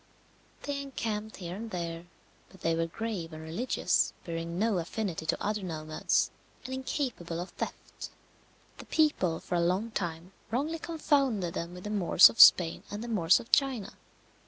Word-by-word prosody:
They 285 Hz, -1 st, -3 dB
encamped 220 Hz, -6 st, -4 dB
here 175 Hz, -1 st, -6 dB
and 225 Hz, +3 st, -6 dB
there, 170 Hz, -2 st, -5 dB, 0.4 s
but 190 Hz, -, -18 dB
they 165 Hz, -, +1 dB
were 165 Hz, 0 st, 0 dB
grave 180 Hz, -4 st, -5 dB
and 155 Hz, 0 st, -8 dB
religious, 170 Hz, +11 st, 0 dB
bearing 165 Hz, 0 st, -4 dB
no 210 Hz, -2 st, +1 dB
affinity 170 Hz, -2 st, -4 dB
to -, -, 0 dB
other 210 Hz, 0 st, -1 dB
nomads, 155 Hz, -4 st, -1 dB, 0.3 s
and 260 Hz, -, -5 dB
incapable 255 Hz, -, -3 dB
of 175 Hz, -, -6 dB
theft. -, -, -7 dB, 0.7 s
The -, -, -9 dB
people 190 Hz, -, +1 dB
for -, -, -7 dB
a 175 Hz, -, +2 dB
long 185 Hz, +7 st, 0 dB
time 170 Hz, -2 st, -4 dB, 0.2 s
wrongly 295 Hz, +9 st, -1 dB
confounded 275 Hz, -, 0 dB
them 170 Hz, +1 st, -5 dB
with 180 Hz, -, -10 dB
the 210 Hz, -, -5 dB
Moors 190 Hz, -3 st, +7 dB
of 230 Hz, -, -14 dB
Spain 165 Hz, -2 st, +7 dB
and 205 Hz, +2 st, -5 dB
the -, -, -6 dB
Moors 185 Hz, -7 st, +4 dB
of 235 Hz, -, -12 dB
China. 260 Hz, -8 st, +1 dB
190 Hz, 165 wpm, -30 LUFS, 170-230 Hz, 0.7 s, Moors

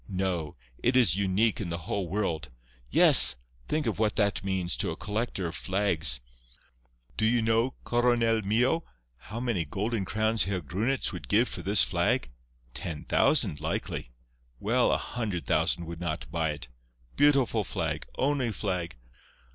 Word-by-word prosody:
No. 90 Hz, -5 st, -3 dB, 0.3 s
It 125 Hz, +2 st, +2 dB
is 110 Hz, -10 st, +4 dB
unique 100 Hz, +3 st, +1 dB
in 90 Hz, -, -4 dB
the 85 Hz, -, -3 dB
whole 90 Hz, +3 st, -4 dB
world. 85 Hz, -7 st, -2 dB, 0.4 s
Yes. -, -, +9 dB, 0.3 s
Think 155 Hz, -1 st, -1 dB
of 110 Hz, -3 st, -2 dB
what 110 Hz, -1 st, +1 dB
that 100 Hz, -3 st, 0 dB
means 95 Hz, -6 st, -1 dB
to -, -, -1 dB
a -, -, -4 dB
collector 105 Hz, -2 st, -3 dB
of 85 Hz, -, -4 dB
flags! 85 Hz, -10 st, -1 dB, 1.0 s
Do -, -, -1 dB
you 115 Hz, +2 st, +3 dB
know, 115 Hz, +3 st, +1 dB
Coronel 120 Hz, -2 st, +1 dB
mio, 120 Hz, +10 st, +1 dB, 0.3 s
how 105 Hz, -, -8 dB
many 120 Hz, -8 st, -1 dB
golden 105 Hz, +4 st, -3 dB
crowns 110 Hz, +2 st, +1 dB
Herr 95 Hz, -1 st, -2 dB
Grunitz 105 Hz, -, -2 dB
would 90 Hz, -, -8 dB
give 115 Hz, +4 st, +3 dB
for -, -, -7 dB
this 100 Hz, 0 st, +4 dB
flag? 65 Hz, 0 st, 0 dB, 0.4 s
Ten 80 Hz, +1 st, -5 dB
thousand, 75 Hz, -, +2 dB
likely. 80 Hz, -4 st, -4 dB, 0.5 s
Well, -, -, +1 dB
a -, -, +2 dB
hundred 105 Hz, -, -4 dB
thousand 85 Hz, +6 st, 0 dB
would 85 Hz, 0 st, -8 dB
not 85 Hz, -3 st, -4 dB
buy 80 Hz, -1 st, -1 dB
it. 75 Hz, -, -9 dB, 0.5 s
Beautiful 135 Hz, -6 st, +3 dB
flag! -, -, -4 dB
Only 135 Hz, -3 st, 0 dB
flag! 90 Hz, -, -3 dB
100 Hz, 155 wpm, -28 LUFS, 85-115 Hz, 1.0 s, Yes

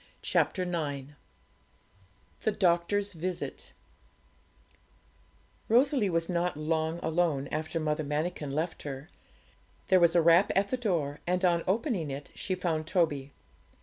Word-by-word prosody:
CHAPTER 185 Hz, -, +1 dB
IX 145 Hz, -6 st, -3 dB, 1.3 s
THE 215 Hz, -, +1 dB
DOCTOR'S 195 Hz, +2 st, +1 dB
VISIT 175 Hz, +2 st, -5 dB, 2.0 s
Rosalie 250 Hz, -2 st, +4 dB
was 165 Hz, -1 st, 0 dB
not 175 Hz, -2 st, -1 dB
long 160 Hz, +1 st, -1 dB
alone 160 Hz, -4 st, +1 dB
after 160 Hz, +2 st, -2 dB
Mother 155 Hz, 0 st, -1 dB
Manikin 150 Hz, +1 st, -2 dB
left 160 Hz, +4 st, -2 dB
her. 140 Hz, +2 st, -7 dB, 0.8 s
There 185 Hz, -, +6 dB
was 170 Hz, -1 st, +4 dB
a 170 Hz, -, +6 dB
rap 170 Hz, +4 st, +5 dB
at 200 Hz, +1 st, +2 dB
the 255 Hz, -, 0 dB
door, 165 Hz, -, -1 dB
and 180 Hz, +1 st, +1 dB
on 170 Hz, -1 st, +3 dB
opening 200 Hz, -, 0 dB
it 140 Hz, +1 st, -6 dB
she 185 Hz, -, -2 dB
found 165 Hz, -4 st, -2 dB
Toby. 150 Hz, -6 st, 0 dB
170 Hz, 125 wpm, -29 LUFS, 155-185 Hz, 2.0 s, There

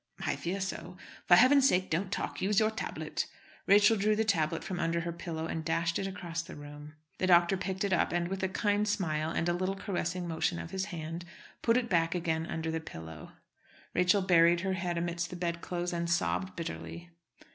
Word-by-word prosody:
"I -, -, 0 dB
fear 185 Hz, +3 st, -3 dB
so. 180 Hz, -2 st, -5 dB, 0.3 s
For 175 Hz, -, +8 dB
heaven's 265 Hz, +6 st, +6 dB
sake 185 Hz, +1 st, +1 dB
don't 185 Hz, +4 st, 0 dB
talk; -, -, -3 dB
use 205 Hz, +3 st, +3 dB
your 215 Hz, 0 st, +3 dB
tablet." 220 Hz, -, -4 dB, 0.4 s
Rachel 205 Hz, +2 st, +6 dB
drew 210 Hz, +1 st, +2 dB
the 220 Hz, +1 st, +1 dB
tablet 165 Hz, -5 st, +1 dB
from 180 Hz, -2 st, -4 dB
under 170 Hz, 0 st, 0 dB
her 170 Hz, 0 st, -3 dB
pillow 165 Hz, -1 st, -5 dB
and 165 Hz, 0 st, -3 dB
dashed 165 Hz, +1 st, 0 dB
it 195 Hz, -, -2 dB
across 175 Hz, -3 st, -4 dB
the 165 Hz, -, -10 dB
room. 145 Hz, +1 st, -10 dB, 0.2 s
The 185 Hz, -, +1 dB
doctor 175 Hz, +1 st, +5 dB
picked 190 Hz, +1 st, -3 dB
it 200 Hz, -2 st, +1 dB
up, -, -, +2 dB
and, 170 Hz, 0 st, 0 dB
with 190 Hz, +1 st, -4 dB
a 190 Hz, -, 0 dB
kind 205 Hz, +2 st, +1 dB
smile 160 Hz, -7 st, 0 dB
and 165 Hz, +1 st, -1 dB
a 175 Hz, -, +2 dB
little 185 Hz, +2 st, -1 dB
caressing 180 Hz, -2 st, -3 dB
motion 170 Hz, +1 st, 0 dB
of 165 Hz, -, -6 dB
his 190 Hz, 0 st, -2 dB
hand, 165 Hz, -3 st, -6 dB, 0.4 s
put 230 Hz, +1 st, +3 dB
it 250 Hz, -, +1 dB, 0.3 s
again 160 Hz, -2 st, 0 dB
back -, -, -7 dB
under 160 Hz, 0 st, -2 dB
the 160 Hz, -, -1 dB
pillow. 80 Hz, -, -9 dB, 0.6 s
Rachel 185 Hz, +2 st, +3 dB
buried 170 Hz, -2 st, +5 dB
her 190 Hz, +1 st, -1 dB
head 175 Hz, -2 st, -2 dB
amidst 170 Hz, 0 st, -2 dB
the -, -, -7 dB
bedclothes 175 Hz, 0 st, -3 dB
and 170 Hz, 0 st, -2 dB
sobbed 185 Hz, +2 st, 0 dB
bitterly. 85 Hz, -, -6 dB
175 Hz, 205 wpm, -31 LUFS, 165-190 Hz, 0.6 s, For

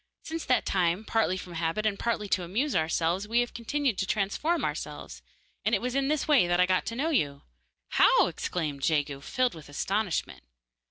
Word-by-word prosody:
Since 325 Hz, 0 st, -5 dB
that 255 Hz, -2 st, +2 dB
time, 180 Hz, +2 st, +1 dB
partly 220 Hz, -5 st, +1 dB
from 180 Hz, -2 st, -8 dB
habit 165 Hz, +5 st, -1 dB
and 205 Hz, -2 st, 0 dB
partly 225 Hz, -3 st, -1 dB
to 185 Hz, -, +2 dB
amuse 215 Hz, -, -1 dB
ourselves, 165 Hz, +4 st, 0 dB
we 235 Hz, +2 st, +3 dB
have 240 Hz, -, -3 dB
continued 250 Hz, -1 st, -1 dB
to 190 Hz, -, -1 dB
transform 225 Hz, -, 0 dB
ourselves, -, -, -5 dB, 0.4 s
and -, -, +2 dB
it -, -, 0 dB
was 250 Hz, 0 st, -3 dB
in 275 Hz, 0 st, +1 dB
this 300 Hz, -1 st, 0 dB
way 280 Hz, -, +5 dB
that 175 Hz, 0 st, +1 dB
I 180 Hz, -, +6 dB
got 185 Hz, 0 st, +1 dB
to 230 Hz, -, -3 dB
know 305 Hz, +7 st, 0 dB
you.' 145 Hz, -, 0 dB, 0.5 s
'How?' -, -, +5 dB
exclaimed 150 Hz, -6 st, -3 dB
Jegu, 145 Hz, -2 st, 0 dB
filled 255 Hz, -, 0 dB
with 155 Hz, -3 st, -12 dB
astonishment. 195 Hz, +5 st, -2 dB
200 Hz, 195 wpm, -28 LUFS, 170-245 Hz, 0.5 s, I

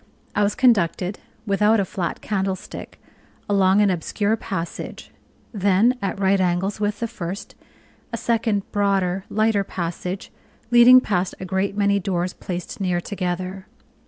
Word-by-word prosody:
I -, -, +2 dB
was 205 Hz, 0 st, +2 dB
conducted 195 Hz, -6 st, +2 dB, 0.3 s
(without 210 Hz, +2 st, +3 dB
a 195 Hz, -, +1 dB
flat 180 Hz, -1 st, -4 dB
candlestick) 190 Hz, -2 st, -4 dB, 0.5 s
along 195 Hz, 0 st, +4 dB
an 205 Hz, -2 st, +4 dB
obscure 205 Hz, +5 st, 0 dB
passage; 185 Hz, -6 st, -6 dB, 0.4 s
then, 205 Hz, +4 st, +3 dB
at 195 Hz, 0 st, -2 dB
right 195 Hz, 0 st, +3 dB
angles 185 Hz, +3 st, 0 dB
with 205 Hz, +1 st, -1 dB
the 230 Hz, -, 0 dB
first, 195 Hz, -3 st, -6 dB, 0.6 s
a 230 Hz, -, -2 dB
second 225 Hz, -3 st, 0 dB
broader, 195 Hz, -2 st, +1 dB
lighter 215 Hz, -1 st, +2 dB
passage, 180 Hz, +1 st, -5 dB, 0.4 s
leading 245 Hz, +1 st, +8 dB
past 185 Hz, -6 st, -1 dB
a 185 Hz, -, -5 dB
great 190 Hz, +2 st, -1 dB
many 200 Hz, -1 st, +3 dB
doors 180 Hz, -1 st, -1 dB
placed 180 Hz, +1 st, -6 dB
near 180 Hz, -2 st, +1 dB
together. 185 Hz, +1 st, -4 dB
195 Hz, 135 wpm, -22 LUFS, 185-210 Hz, 0.6 s, leading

